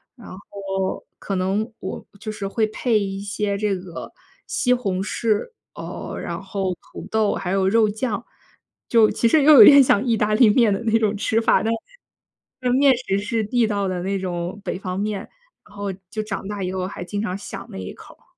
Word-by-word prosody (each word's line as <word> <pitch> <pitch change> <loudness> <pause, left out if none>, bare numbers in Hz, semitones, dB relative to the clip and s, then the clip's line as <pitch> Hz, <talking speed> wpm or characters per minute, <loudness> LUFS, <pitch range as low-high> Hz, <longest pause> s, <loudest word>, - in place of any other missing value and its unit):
然 235 - -14
后 195 0 -4
可 195 - -4
能 200 +5 -1
我 - - -6
就 215 - -5
是 210 -2 -5
会 220 +2 +1
配 220 0 +1
一 195 -1 -3
些 200 0 -2
这 205 -1 0
个 180 -2 -9 0.4
西 250 -1 +1
红 195 -7 -1
柿， 220 - -1 0.2
哦， - - -7
然 - - -5
后 190 -1 -2 0.2
土 - - -8
豆， 220 -2 +1
还 180 - -3
有 190 -1 +2
肉 220 +1 +4
酱。 220 +1 -3 0.6
就 225 -2 +5
其 235 - +1
实 290 +5 +4
又 305 +1 +8
有 220 -6 +11
点 280 -1 +9
像 225 -3 +3
意 235 -2 +2
大 210 0 +1
利 220 0 +6
面 220 -2 +4
的 195 - -3
那 225 0 +3
种 215 -2 +1
吃 225 +2 +1
法， - - +3
但 225 - 0 0.9
是 250 -1 +1
面 270 +1 +5
食 200 -6 -1
是 215 +2 -1
地 230 +2 +1
道 200 -2 -1
的 180 -1 -2
那 195 +2 -1
种 180 +1 -4
北 185 - -4
方 185 -1 -4
面， 210 -1 -2 0.5
然 205 - -18
后 200 -1 -3 0.2
就 215 -1 -3
长 200 -2 -5
大 205 -1 -4
以 185 - -2
后 185 -1 -2
还 190 - -7
经 205 +3 -4
常 190 -3 -3
想 205 - -8
那 - - -8
一 95 -1 -6
口 - - -15
儿。 - - -33
205 Hz, 225 characters per minute, -22 LUFS, 195-225 Hz, 0.9 s, 有